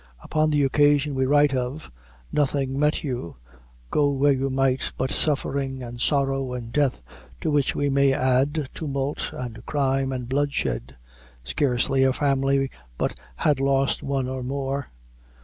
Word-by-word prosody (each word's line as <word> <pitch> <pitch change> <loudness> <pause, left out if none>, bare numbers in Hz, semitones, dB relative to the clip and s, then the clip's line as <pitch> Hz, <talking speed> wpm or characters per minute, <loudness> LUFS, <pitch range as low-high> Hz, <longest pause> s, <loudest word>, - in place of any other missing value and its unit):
Upon 155 0 +1
the 145 -1 +2
occasion 145 +1 +3
we 130 -1 +1
write 145 0 +4
of, 130 +4 -3 0.4
nothing 140 -2 0
met 150 +1 +1
you, 125 - -4 0.6
go 145 -1 +3
where 140 +1 +3
you 135 +1 -1
might, 135 0 +1
but 130 +1 -1
suffering, 135 -3 -1
and 120 0 -7
sorrow, 135 -2 +1
and 120 -2 -6
death, 140 - +1 0.4
to 155 - 0
which 145 -2 +1
we 145 - 0
may 140 0 +3
add, 135 +2 +1
tumult, 140 -2 -3
and 115 -2 -7
crime, 135 -2 +1
and 125 -2 -4
bloodshed. 130 - -1 0.5
Scarcely 130 - +1
a 130 -1 +3
family 135 -1 +1 0.3
but - - 0 0.2
had 145 - +1
lost 135 0 +1
one 135 -2 -1
or 130 0 -4
more. 135 +1 -3
135 Hz, 150 wpm, -24 LUFS, 130-145 Hz, 0.6 s, write